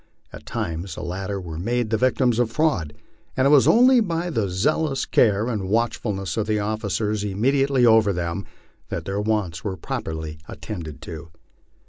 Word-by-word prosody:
At - - -11
times 85 +2 -4
the - - -6
latter 95 +3 -4
were 85 -3 -7
made 115 +3 -1
the - - +3
victims 125 -1 +2
of 120 -2 +2
fraud, 115 - 0 0.4
and 130 - +3
it 140 - +5
was 145 -3 +6
only 250 +2 +6
by 175 -4 -1
the 110 - 0
zealous 135 - 0
care 105 -2 +3
and 105 -6 -2
watchfulness 105 -5 -1
of 110 -1 0
the 110 -1 +1
officers 105 0 -1
immediately 130 +6 +2
over 110 -3 +5
them, 85 +1 -3 0.4
that - - -4
their 100 +1 -2
wants 105 -7 -1
were 95 -2 -3
properly 80 -2 -5
attended 85 -9 -7
to. 80 0 -8
105 Hz, 165 wpm, -23 LUFS, 95-125 Hz, 0.4 s, was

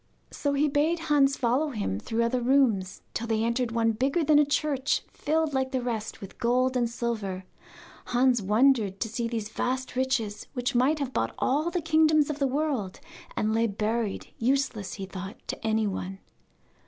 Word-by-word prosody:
So 285 -1 -1
he 285 +2 +2
bade 300 +4 +2
Hans 295 -4 +2
follow 260 +6 +1
him 200 - -2
through 230 - -1
other 245 +2 0
rooms, 235 -8 +2
till 230 - -3
they 225 -1 +1
entered 235 +1 0
one 230 0 +2
bigger 270 +9 0
than 300 0 +5
a 295 - +5
church, 285 -1 0
filled, 315 0 0
like 265 -1 0
the 260 - 0
rest, 225 -3 -4
with 195 - -10
gold 255 +2 +2
and 240 -2 +1
silver. 215 -6 -3 0.6
Hans 245 -1 +2
wondered 210 -1 +3
to 225 - -1
see 230 +1 -2
these 225 -2 -3
vast 255 +3 -2
riches, 255 -5 -1
which 250 +1 -1
might 260 +6 +3
have 275 -3 -3
bought - - -1
all 300 +6 +1
the 355 0 -2
kingdoms 310 -1 +3
of 295 - -6
the 275 - +2
world, 265 -9 -2 0.4
and 215 +1 0
lay 230 +1 +2
buried, 215 0 -2
useless, 250 -5 0
he 195 - -5
thought, 190 +2 -7
to - - -4
anyone. 205 -3 -1
245 Hz, 180 wpm, -27 LUFS, 220-280 Hz, 0.6 s, than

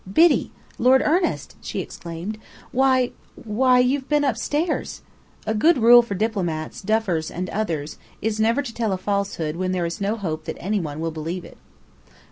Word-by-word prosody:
"Biddy! 330 - +4 0.3
Lord 260 +2 +5
Ernest!" 345 +3 0
she - - -4
exclaimed. 175 +5 -6 0.3
"Why 260 -1 +3 0.2
why 250 +4 +2
you 250 +3 +3
have 265 - -16
been 295 -1 +3
upstairs!" 290 +6 -1 0.4
A 220 - 0
good 310 +10 +4
rule 240 +1 +8
for 230 -4 -5
diplomats, 180 -7 -2
duffers, 195 -6 0
and 180 +1 -5
others, 165 -8 -3 0.2
is 220 0 -2
never 230 +6 +2
to 235 -4 -7
tell 225 -4 -1
a - - -1
falsehood 185 -5 -2
when 185 0 -1
there 180 -2 0
is 170 +5 -4
no 200 +2 0
hope 160 -7 -4
that - - -5
any 205 +4 -1
one 155 -3 -5
will 165 0 -1
believe 165 +3 -5
it. - - -14
215 Hz, 175 wpm, -23 LUFS, 175-250 Hz, 0.4 s, rule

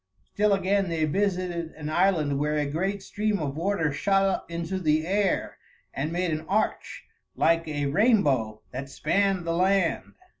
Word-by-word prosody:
Still 210 0 +3
again 195 0 +1
they 160 -2 0
visited 180 -1 -1
an 150 -1 -7
island 155 -4 +1
where 150 +1 0
a 150 - +1
great 190 +7 -2
stream 210 +1 -1
of 145 -5 -3
water 165 -3 0
shot 195 +5 +2
up 195 -3 -1
into 170 +2 -3
the 155 -2 +1
air 195 +1 0 0.3
and 150 +4 -3
made 175 0 -1
an 155 0 -2
arch 210 +3 -1 0.3
like 165 0 +2
a 145 -2 -2
rainbow 140 - +2
that 135 +2 -6
spanned 195 +5 0
the 165 - -1
land. 185 0 +1
170 Hz, 160 wpm, -26 LUFS, 150-195 Hz, 0.3 s, Still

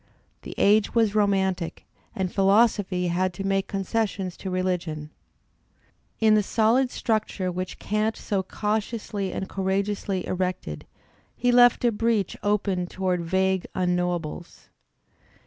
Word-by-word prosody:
The - - -9
age 210 +2 +3
was 225 -3 +3
romantic, 190 -4 0 0.3
and 185 -2 -2
philosophy 195 -3 +3
had 180 +1 0
to 195 - -5
make 195 0 0
concessions 195 -2 -2
to 190 - -6
religion. 180 -5 -2 1.1
In 220 -1 +5
the 215 - +5
solid 230 +5 +2
structure 215 -6 -1
which 185 +1 -5
Kant 215 +1 -1
so 200 -2 -1
cautiously 210 0 -3
and 190 - -4
courageously 195 0 -1
erected, 180 - -3 0.5
he 245 +1 +1
left 245 0 +5
a 240 - +4
breach 220 -3 0
opened 195 -3 0
toward 185 -2 -1
vague 190 +2 0
unknowables. 180 -2 -2
195 Hz, 120 wpm, -25 LUFS, 185-215 Hz, 1.1 s, In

